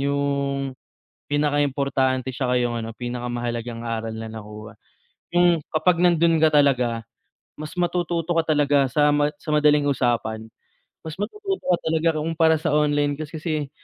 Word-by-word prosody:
'yung, 140 0 -1 0.7
pinakaimportante 140 -3 0
'tsaka 125 -1 0
'yung 120 -1 -1
ano, 115 0 -5
pinakamahalagang 120 -1 -4
aral 115 -1 -3
na 110 0 -6
nakuha, 105 0 -9 0.6
'yung 175 -1 +4
kapag 165 +2 +2
nandun 170 -2 +4
ka 160 - +6
talaga 125 -6 +2 0.6
mas 155 0 -7
matututo 175 -1 -1
ka 165 -1 +2
talaga 140 -2 +3
sa 145 +3 +3
ma 145 0 +2
sa 155 - -8
madaling 150 -1 +4
usapan, 115 -4 -1 0.5
mas 160 -1 -8
matututo 390 - -4
ka 180 -2 +2
talaga 160 0 +1
kumpara 160 0 +2
sa 160 - -1
online 145 -1 +2
class, 155 0 -7
kasi 155 -3 -3
145 Hz, 140 wpm, -23 LUFS, 125-160 Hz, 0.7 s, ka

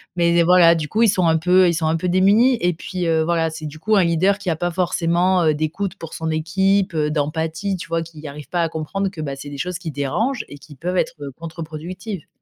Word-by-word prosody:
Mais 170 -1 +2
de 170 - +5
voilà 175 -1 +6
du 155 -2 -3
coup 220 - -1
ils 230 - +6
sont 185 -2 +2
un 160 -1 +4
peu 180 +2 +4
ils 170 - +1
sont 160 -1 -1
un 160 - +1
peu 180 - -2
démunis 205 +7 +4
et 175 0 +2
puis, 180 +1 -4
heu, 160 -1 +2
voilà 165 -1 +1
c'est 160 0 -8
du 155 +1 -8
coup 215 +5 +1
un 195 - +5
leader 175 +4 +2
qui 195 -4 -2
a 160 - 0
pas 175 +3 -1
forcément, 175 +1 +1
heu, 155 -2 +3
d'écoute 165 +5 -3
pour 165 -5 -9
son 160 0 -3
équipe, 190 +4 +1
heu, 150 -1 0
d'empathie 160 +6 -2
tu - - -8
vois? 165 0 -1
Qui 160 -2 -11
arrive 145 +1 -9
pas 175 -1 0
à 165 - 0
comprendre 165 +5 -3
que, 175 -5 -8
bah, 140 -3 -4
c'est 145 +1 -9
des 145 - -8
choses 180 +4 -3
qui 170 - -5
dérangent 210 - -1
et 145 - -10
qui 145 +1 -14
peuvent 180 +7 -3
être, - - 0
heu, 140 -1 -6
contre-productives. 165 +3 -7
170 Hz, 260 wpm, -21 LUFS, 155-185 Hz, -, voilà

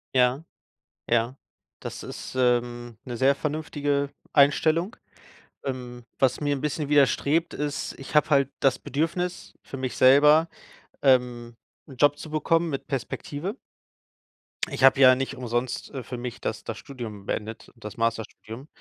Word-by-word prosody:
Ja, 130 +4 +3 0.6
ja. 120 +2 +1 0.4
Das - - -7
ist, - - -8
ähm, 120 -2 0
'ne 125 -2 -5
sehr 135 +3 +4
vernünftige 145 -1 -2 0.2
Einstellung. 160 - +3 0.7
Ähm, 125 -2 -6
was 130 +1 +2
mir 145 -1 +1
'n 135 - -6
bisschen 150 -1 -2
widerstrebt, 145 +3 +2
ist 145 -1 -3
ich 135 - -9
habe 150 - +4
halt 140 -3 +3
das 135 -2 +3
Bedürfnis 170 +4 -3
für 135 - -8
mich 130 -1 -4
selber, 150 +5 +6 0.6
ähm, 125 -3 +2 0.3
'n 135 -4 -12
Job 145 +2 +4
zu 155 - -9
bekommen 165 +2 +1
mit 135 - -5
Perspektive. 145 - -4 1.1
Ich - - -4
habe 135 0 +7
ja 130 -1 +8
nicht 135 +1 -3
umsonst, 120 -1 -3
äh, 135 -3 -6
für 125 +1 -6
mich 120 0 -6
das 110 -1 -4
das 115 - -5
Studium 115 -7 -8
beendet, 110 +1 -5
das 105 -3 -9
Masterstudium. 115 +2 -3
135 Hz, 145 wpm, -25 LUFS, 120-145 Hz, 1.1 s, ja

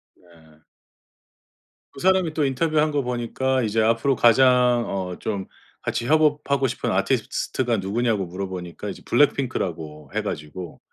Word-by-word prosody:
네. 80 -3 -22 1.3
그 - - -11
사람이 185 -1 +2
또 155 -2 +1
인터뷰한 155 +3 +1
거 145 -1 0
보니까 125 +1 -1
이제 110 0 +1
앞으로 115 +4 +2
가장 125 0 +4
어 95 -2 -4
좀 100 -3 -3 0.3
같이 115 - -2
협업하고 145 -2 +2
싶은 - - -3
아티스트가 120 -3 0
누구냐고 105 +1 0
물어보니까 90 -1 -6
이제 - - -8
블랙핑크라고 85 - 0
해 - - 0
가지고 80 +3 -6
120 Hz, 315 characters per minute, -23 LUFS, 95-135 Hz, 1.3 s, 가장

